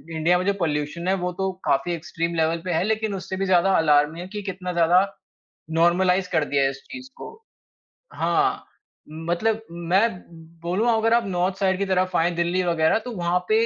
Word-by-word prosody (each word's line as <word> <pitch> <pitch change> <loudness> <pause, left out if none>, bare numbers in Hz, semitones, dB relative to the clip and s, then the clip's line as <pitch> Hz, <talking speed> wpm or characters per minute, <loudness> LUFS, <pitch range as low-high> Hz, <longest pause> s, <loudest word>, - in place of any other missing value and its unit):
India 165 +3 +3
में 185 - -2
जो 200 - +2
pollution 155 +1 -2
है 190 - +3
वो 180 - -1
तो 190 +1 -2
काफ़ी 140 +6 +1
एक्सट्रीम 170 0 -3
लेवल 165 +1 0
पे 180 - -2
है, 160 - +1
लेकिन 220 0 -1
उससे 190 0 -5
भी 195 - -1
ज़्यादा 185 0 +3
अलार्मिंग 150 +1 +3
है - - -8
कि 210 - -4
कितना 180 -2 -5
ज़्यादा 170 +2 +4 0.8
नॉर्मलाइज़ 180 +2 +3
कर 160 -3 +2
दिया 140 -1 0
है 135 - +2
इस 135 0 -10
चीज़ 260 0 -9
को - - -9 0.8
हाँ, - - 0 0.4
मतलब 175 +8 -1
मैं, 175 +6 +2 0.5
बोलूँगा 200 +8 +1
अगर 225 +1 +2
आप 235 -1 +3
नॉर्थ 185 0 0
साइड 190 -2 +1
की 200 - -1
तरफ 185 -1 0
आएँ, 175 +1 +2
दिल्ली 175 +2 0
वगैरह 170 +3 +2
तो 245 - -5
वहाँ 175 +1 +1
पे 220 +1 +4
180 Hz, 195 wpm, -23 LUFS, 165-195 Hz, 0.8 s, ज़्यादा